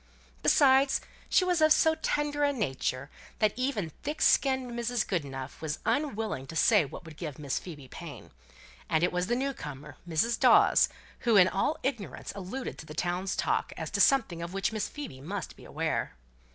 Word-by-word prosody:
Besides, 270 - +5 0.3
she 370 - +4
was 355 -3 +1
of 310 0 +5
so 320 +1 +5
tender 295 -2 -1
a 285 - +3
nature 135 - -2 0.3
that 215 -1 +2
even 240 - -2
thick 300 +2 -4
skinned 260 -2 +3
Mrs. 235 0 -1
Goodenough 140 -7 -4
was 155 -2 -3
unwilling 220 - -1
to 165 - -8
say 210 +3 +5
what 140 - -10
would 160 -2 -11
give 155 -6 -6
Miss 140 -3 -2
Phoebe 150 -7 -10
pain; 140 -6 -10 0.6
and 160 +1 +2
it 175 - +3
was 180 0 -1
the 240 - +1
new 275 +2 -1
comer 145 - -9
Mrs. 225 +9 +1
Dawes, - - +6 0.3
who 235 -2 +2
in 180 -2 +7
all 200 +11 0
ignorance 240 -7 -4
alluded 200 +7 -6
to 160 - -10
the 155 - -9
town's 180 +2 -1
talk, - - 0
as - - -5
to - - +1
something 225 - +3
of 170 +2 -6
which 195 +4 0
Miss 215 -1 -2
Phoebe 150 - -8
must 185 +4 -5
be - - -15
aware. - - -2
200 Hz, 185 wpm, -29 LUFS, -, 0.6 s, in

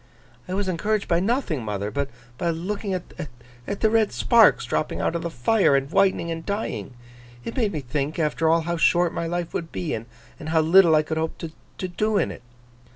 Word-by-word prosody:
'I 185 - -3
was 200 0 -1
encouraged 205 +4 -1
by 170 - +2
nothing, 195 - -1
mother, 105 -1 -3
but 140 -1 -2 0.3
by 170 - 0
looking 190 +4 -2
at 180 - -2 0.7
the 205 +2 +1
red 220 -2 +3
sparks 230 -4 +4
dropping 155 - -2
out - - 0
of 170 - -1
the 170 - -3
fire, 165 - +3
and 135 +1 0
whitening 190 -3 +2
and 165 0 -4
dying. 200 - -4 0.5
It 230 - -5
made 225 -6 +1
me 155 -5 -3
think, 140 +3 -3
after 160 0 +1
all, 165 +1 +4
how 170 +1 -2
short 175 +1 +3
my 170 - -2
life 175 0 -3
would 165 -2 -4
be, 170 - -3
and 115 +1 -5 0.4
how 160 0 +3
little 165 0 +6
I 155 - +4
could 160 +1 -3
hope 160 0 -2 0.4
to 185 - -3
do 210 +4 0
in - - +1
it. - - -10
170 Hz, 205 wpm, -24 LUFS, 155-200 Hz, 0.7 s, little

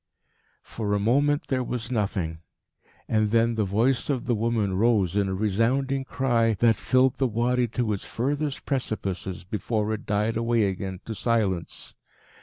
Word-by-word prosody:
For 105 -2 -2
a - - +1
moment 145 +7 +2
there 130 -2 +1
was 120 -1 -4
nothing. 95 -8 -1 0.7
And 110 -1 +2
then 115 +1 +3
the 110 -1 0
voice 115 +7 +1
of 135 -4 -1
the 125 - +1
woman 110 -3 0
rose 100 -3 +2
in 100 -1 +2
a 95 - -1
resounding 125 +7 0
cry 115 -5 +1
that 115 +3 +4
filled 130 +2 +2
the 135 - +2
Wadi 120 +2 +1
to 115 -1 -1
its 100 - -4
furthest 140 +3 -2
precipices, 95 -8 -3
before 105 +3 -2
it 110 - -6
died 105 +2 0
away 115 -1 +2
again 95 -1 -3
to 115 - -4
silence. 105 -7 -1
115 Hz, 160 wpm, -26 LUFS, 100-125 Hz, 0.7 s, that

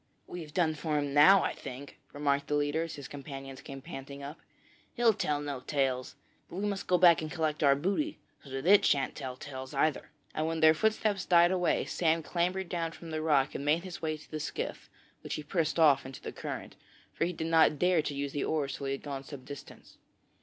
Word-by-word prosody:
'We've 165 -4 -8
done 160 -1 +2
for 155 0 -2
him 145 -1 -1
now 180 +6 +7
I - - -1
think,' 135 +3 -9
remarked 140 -1 0
the 150 - 0
leader, 145 +2 +1
as 165 -1 -4
his 140 - -8
companions 135 -1 -8
came 135 -1 -9
panting 140 -3 -8
up. 145 +3 -8 0.6
'He'll 235 -2 +4
tell 150 -6 -1
no 145 -2 -4
tales; 130 -2 -1 0.3
but - - -9
we 200 +3 -2
must 200 -2 -3
go 180 - +4
back 170 -3 +6
and 155 - -4
collect 155 -3 -1
our 140 -2 +5
booty, 200 - -1 0.3
so 140 - -13
that 135 +2 -5
it 200 +3 +7
shan't 140 -2 +2
tell 130 -3 -5
tales 130 0 -8
either,' 145 +1 +1 0.2
and 155 +1 -1
when 165 0 -2
their 160 0 +7
footsteps 215 +2 +1
died 175 0 +5
away 180 -2 +1
Sam 165 -1 +1
clambered 180 +3 -1
down 165 -2 -2
from 165 0 -10
the 155 0 -2
rock 145 -3 +2
and - - -4
made 155 +4 +2
his 185 -2 -8
way 155 -1 -1
to 155 - -17
the 155 - -3
skiff, 150 - -5 0.3
which - - -4
he 150 - -5
pushed 160 +1 -1
off 155 -4 +5
into 130 0 -9
the - - -6
current, - - -6 0.4
for - - 0
he 175 - -1
did 160 -2 -4
not 160 -2 +4
dare 180 -1 +3
to 150 -1 -4
use 140 0 -3
the 145 - -2
oars 145 -4 -1
till 140 - -5
he 135 - 0
had 135 - -6
gone 140 -2 -5
some 135 -2 -10
distance. 145 -1 -11
155 Hz, 225 wpm, -30 LUFS, 140-170 Hz, 0.6 s, now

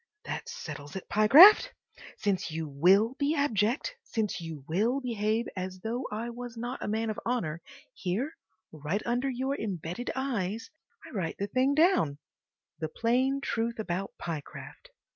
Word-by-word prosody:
That 470 - -5
settles 455 - -7
it, 190 - -6
Pyecraft! 335 - +8 0.4
Since 200 -4 -1
you 160 0 -4
WILL 190 - +4
be 290 +2 +1
abject, 270 - +1
since 215 -5 -2
you 160 -5 -7
WILL 220 +11 +1
behave 225 -2 0
as 185 0 -5
though 240 +5 -3
I 225 +3 -3
was 240 0 -8
not 240 +3 -4
a - - -3
man 220 +1 0
of 215 - -5
honour, 175 -10 -2 0.3
here, 210 - -2 0.4
right 155 +7 -3
under 245 +3 0
your 265 +2 -1
embedded 190 +2 -4
eyes, 225 -5 -2 0.3
I - - -11
write 185 -8 -3
the 200 - -1
thing 260 +6 +1
down—the 160 - -1
plain 255 - +1
truth 235 -3 -1
about 195 -2 -3
Pyecraft. 160 -4 -7
220 Hz, 145 wpm, -29 LUFS, 185-255 Hz, 0.4 s, Pyecraft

